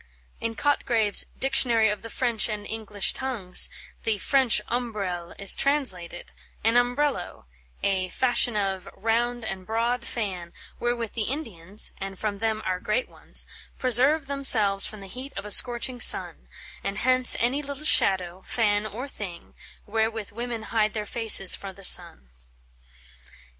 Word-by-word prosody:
In 230 Hz, 0 st, -4 dB
Cotgrave's 230 Hz, -8 st, +3 dB
"Dictionary 250 Hz, -4 st, +3 dB
of 210 Hz, -1 st, -3 dB
the 230 Hz, -, -10 dB
French 235 Hz, -2 st, 0 dB
and 210 Hz, -1 st, -5 dB
English 210 Hz, -2 st, -1 dB
Tongues," 230 Hz, -9 st, +2 dB, 0.3 s
the 220 Hz, -2 st, -1 dB
French 260 Hz, +2 st, +3 dB
Ombrelle 200 Hz, -8 st, -5 dB
is 200 Hz, -1 st, +3 dB
translated, 195 Hz, -13 st, -1 dB, 0.3 s
"An 225 Hz, +1 st, +2 dB
umbrello; 245 Hz, -3 st, -1 dB, 0.4 s
a 190 Hz, -2 st, -1 dB
(fashion 245 Hz, -1 st, +1 dB
of) 195 Hz, -2 st, -3 dB
round 235 Hz, +2 st, -2 dB
and 190 Hz, -3 st, -6 dB
broad 235 Hz, +4 st, -2 dB
fanne, 185 Hz, -8 st, -5 dB, 0.3 s
wherewith 240 Hz, -2 st, -3 dB
the 220 Hz, -2 st, -3 dB
Indians 210 Hz, -, -3 dB
(and 195 Hz, 0 st, -7 dB
from 205 Hz, -1 st, -4 dB
them 220 Hz, 0 st, -2 dB
our 185 Hz, -1 st, -2 dB
great 215 Hz, +6 st, -2 dB
ones) -, -, -4 dB, 0.3 s
preserve 265 Hz, +5 st, +2 dB
themselves 225 Hz, -8 st, +4 dB
from 215 Hz, -2 st, -9 dB
the -, -, -10 dB
heat 255 Hz, +7 st, -9 dB
of 200 Hz, -, -6 dB
a 210 Hz, -, -4 dB
scorching 245 Hz, +2 st, +3 dB
sunne; -, -, +3 dB, 0.4 s
and 200 Hz, -, -4 dB
hence 255 Hz, +2 st, +3 dB
any 255 Hz, +5 st, 0 dB
little 285 Hz, +1 st, -7 dB
shadow, 185 Hz, -, +2 dB
fanne, 210 Hz, -2 st, -1 dB
or 240 Hz, +6 st, -7 dB
thing, 190 Hz, -10 st, -9 dB, 0.3 s
wherewith 220 Hz, 0 st, -3 dB
women 235 Hz, +1 st, -6 dB
hide 215 Hz, -1 st, 0 dB
their 210 Hz, -1 st, -4 dB
faces 220 Hz, -4 st, +4 dB
fro 195 Hz, -, -5 dB
the 195 Hz, +1 st, -16 dB
sunne." 65 Hz, -, +6 dB
220 Hz, 145 wpm, -24 LUFS, 200-245 Hz, 0.4 s, sunne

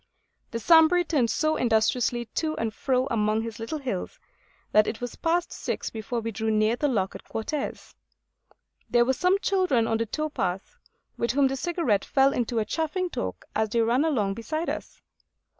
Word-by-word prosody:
The 230 Hz, -, -4 dB
Sambre 325 Hz, +7 st, +5 dB
turned 275 Hz, -9 st, +1 dB
so 310 Hz, +7 st, +1 dB
industriously 240 Hz, +1 st, +1 dB
to 310 Hz, -1 st, -1 dB
and 225 Hz, -1 st, -2 dB
fro 255 Hz, +2 st, 0 dB
among 215 Hz, -1 st, +1 dB
his 225 Hz, -1 st, -6 dB
little 230 Hz, +8 st, -4 dB
hills, 265 Hz, -, -4 dB, 0.5 s
that 215 Hz, 0 st, +5 dB
it 220 Hz, -, -3 dB
was 245 Hz, -1 st, -5 dB
past 340 Hz, +1 st, 0 dB
six -, -, -4 dB
before 230 Hz, +2 st, -4 dB
we 225 Hz, 0 st, -3 dB
drew 220 Hz, +1 st, -2 dB
near 215 Hz, +1 st, +2 dB
the 295 Hz, -, 0 dB
lock 200 Hz, -8 st, 0 dB
at -, -, -9 dB
Quartes. 275 Hz, +6 st, -4 dB, 1.0 s
There 240 Hz, 0 st, +4 dB
were 265 Hz, -, +2 dB
some 360 Hz, +8 st, +2 dB
children 365 Hz, -, +2 dB
on 225 Hz, -, +1 dB
the 230 Hz, -, -1 dB
tow 310 Hz, +7 st, -2 dB
path, 190 Hz, -, -3 dB, 0.4 s
with 235 Hz, -, -1 dB
whom 275 Hz, 0 st, +4 dB
the 270 Hz, -, -2 dB
Cigarette 270 Hz, -, 0 dB
fell 270 Hz, 0 st, +3 dB
into 240 Hz, -1 st, -1 dB
a 220 Hz, -, +1 dB
chaffing 335 Hz, -, -2 dB
talk -, -, -4 dB
as 220 Hz, 0 st, +1 dB
they 230 Hz, +2 st, +1 dB
ran 240 Hz, +5 st, +2 dB
along 225 Hz, -11 st, +1 dB
beside 310 Hz, +10 st, -3 dB
us. -, -, -8 dB
240 Hz, 185 wpm, -26 LUFS, 220-310 Hz, 1.0 s, Sambre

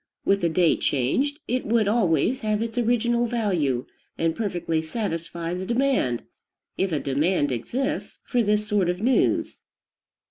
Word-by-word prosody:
With 200 Hz, 0 st, +3 dB
the 170 Hz, -, +2 dB
date 170 Hz, 0 st, +2 dB
changed, 255 Hz, -, +1 dB
it 250 Hz, +2 st, 0 dB
would 220 Hz, -1 st, +2 dB
always, 210 Hz, -, +2 dB
have 215 Hz, -2 st, 0 dB
its 230 Hz, -1 st, -5 dB
original 240 Hz, 0 st, +2 dB
value, 180 Hz, -, 0 dB, 0.3 s
and 165 Hz, 0 st, 0 dB
perfectly 175 Hz, -7 st, -1 dB
satisfy 170 Hz, -2 st, -4 dB
the 180 Hz, +1 st, -3 dB
demand, 235 Hz, -, +1 dB, 0.5 s
if 190 Hz, -1 st, 0 dB
a 155 Hz, -, +1 dB
demand 145 Hz, +2 st, +1 dB
exists, 235 Hz, -, -3 dB
for 245 Hz, -, +1 dB
this 210 Hz, -1 st, +1 dB
sort 205 Hz, -5 st, +1 dB
of 180 Hz, 0 st, -1 dB
news. 245 Hz, +5 st, +1 dB
200 Hz, 145 wpm, -25 LUFS, 165-235 Hz, 0.5 s, With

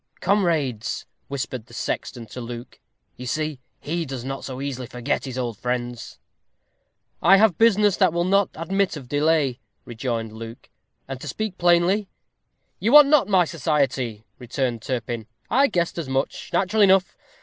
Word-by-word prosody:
"Comrades!" 160 Hz, -, 0 dB, 0.2 s
whispered 130 Hz, -4 st, -4 dB
the -, -, -13 dB
sexton 120 Hz, -, -4 dB
to 125 Hz, +3 st, -8 dB
Luke; 120 Hz, 0 st, -8 dB, 0.4 s
"you 125 Hz, -, -7 dB
see 155 Hz, +2 st, -2 dB, 0.2 s
he 170 Hz, +3 st, -2 dB
does 130 Hz, -4 st, -6 dB
not 135 Hz, 0 st, -5 dB
so 130 Hz, -1 st, -6 dB
easily 130 Hz, -3 st, -4 dB
forget 125 Hz, +3 st, -2 dB
his 130 Hz, -1 st, -6 dB
old 120 Hz, -5 st, -3 dB
friends." 120 Hz, -1 st, -4 dB, 1.0 s
"I 195 Hz, -, +7 dB
have 200 Hz, -5 st, +3 dB
business 210 Hz, -3 st, +4 dB
that 185 Hz, -4 st, +4 dB
will 170 Hz, +1 st, 0 dB
not 195 Hz, +2 st, +3 dB
admit 190 Hz, +1 st, -1 dB
of 135 Hz, -4 st, -10 dB
delay," 145 Hz, -2 st, +1 dB, 0.3 s
rejoined 115 Hz, -1 st, -3 dB
Luke; 115 Hz, +1 st, -10 dB, 0.4 s
"and 135 Hz, -1 st, -6 dB
to -, -, -7 dB
speak 215 Hz, +7 st, -3 dB
plainly 175 Hz, +4 st, +3 dB, 0.4 s
" -, -, -49 dB
"You 230 Hz, +5 st, +1 dB
want 295 Hz, -1 st, +9 dB
not 300 Hz, -2 st, +5 dB
my 185 Hz, -3 st, +4 dB
society," 135 Hz, -9 st, -1 dB, 0.2 s
returned 125 Hz, -1 st, -2 dB
Turpin; 120 Hz, -3 st, -4 dB, 0.2 s
"I 275 Hz, +4 st, +5 dB
guessed 170 Hz, -5 st, -1 dB
as 155 Hz, -5 st, -5 dB
much. 135 Hz, +1 st, -2 dB
Natural 205 Hz, +3 st, +1 dB
enough! 190 Hz, -2 st, +4 dB
140 Hz, 160 wpm, -23 LUFS, 125-185 Hz, 1.0 s, want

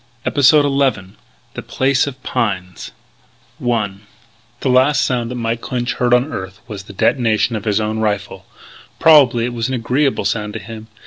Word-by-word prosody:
EPISODE 145 Hz, +1 st, +4 dB
ELEVEN 135 Hz, -9 st, 0 dB, 0.4 s
THE -, -, -6 dB
PLACE 135 Hz, +1 st, 0 dB
OF 130 Hz, -2 st, -8 dB
PINES 95 Hz, -7 st, -3 dB, 0.7 s
I 115 Hz, -5 st, 0 dB, 0.7 s
The 135 Hz, -, 0 dB
last 130 Hz, +3 st, +3 dB
sound 120 Hz, -2 st, -1 dB
that 125 Hz, -, -5 dB
Mike 115 Hz, -1 st, -2 dB
Clinch 125 Hz, -1 st, -3 dB
heard 125 Hz, -1 st, -1 dB
on 125 Hz, +5 st, +2 dB
earth 95 Hz, +1 st, -6 dB
was 100 Hz, -4 st, -8 dB
the -, -, -11 dB
detonation 115 Hz, +1 st, +1 dB
of 105 Hz, -, -5 dB
his 105 Hz, 0 st, +1 dB
own 110 Hz, 0 st, -2 dB
rifle. 105 Hz, -2 st, -3 dB, 0.5 s
Probably 135 Hz, -7 st, +5 dB
it 120 Hz, -, -4 dB
was 115 Hz, 0 st, -2 dB
an 130 Hz, -, -2 dB
agreeable 130 Hz, +4 st, 0 dB
sound 105 Hz, -1 st, -2 dB
to 115 Hz, -, -5 dB
him. 110 Hz, +2 st, -10 dB
120 Hz, 170 wpm, -18 LUFS, 105-130 Hz, 0.7 s, Probably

